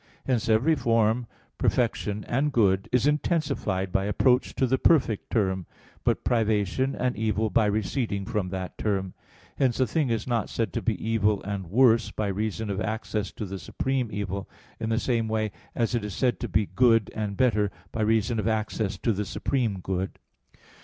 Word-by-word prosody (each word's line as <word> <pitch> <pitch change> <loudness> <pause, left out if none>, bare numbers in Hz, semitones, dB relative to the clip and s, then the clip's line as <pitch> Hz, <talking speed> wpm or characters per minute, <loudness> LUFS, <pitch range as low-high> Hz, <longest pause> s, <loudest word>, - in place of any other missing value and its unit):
Hence 120 -4 0
every 115 +9 +4
form, 115 -3 +2 0.3
perfection, 105 -4 0
and 140 +5 +1
good 100 -6 +2
is 125 0 +3
intensified 145 - 0
by 95 +1 +1
approach 125 +5 +2
to 130 - +2
the 130 +1 +1
perfect 130 -10 +3
term; 95 -5 0 0.4
but - - +1
privation 110 +2 +1
and 125 -1 -1
evil 110 0 0
by 110 +2 +3
receding 105 0 -1
from 95 -2 -2
that 95 -1 -5
term. 95 -3 -1 0.4
Hence 130 -3 +1
a 130 - +4
thing 150 -1 0
is 115 -2 -1
not 120 -4 -1
said 115 - -2
to - - -1
be 110 -5 0
evil 105 -3 +2
and 95 -3 -4
worse, 115 +2 +4
by 105 -2 -2
reason 105 +1 -2
of 100 +2 -2
access 110 -2 -2
to 105 - -5
the 95 0 -6
supreme 130 +1 -2
evil, 100 -1 -4 0.3
in 110 -1 -2
the 115 - +1
same 115 -4 0
way 110 -1 -1 0.2
as 115 0 0
it 120 -3 0
is 105 -3 -5
said 125 -2 +1
to 120 - -3
be 105 -1 +1
good 115 -2 +3
and 105 -2 -3
better, 105 -5 +3 0.2
by 110 - -3
reason 110 +1 +2
of 110 - -1
access 110 -2 -1
to 115 - 0
the 105 +1 -2
supreme 105 0 -1
good. 95 +1 -3
110 Hz, 180 wpm, -26 LUFS, 100-120 Hz, 0.4 s, every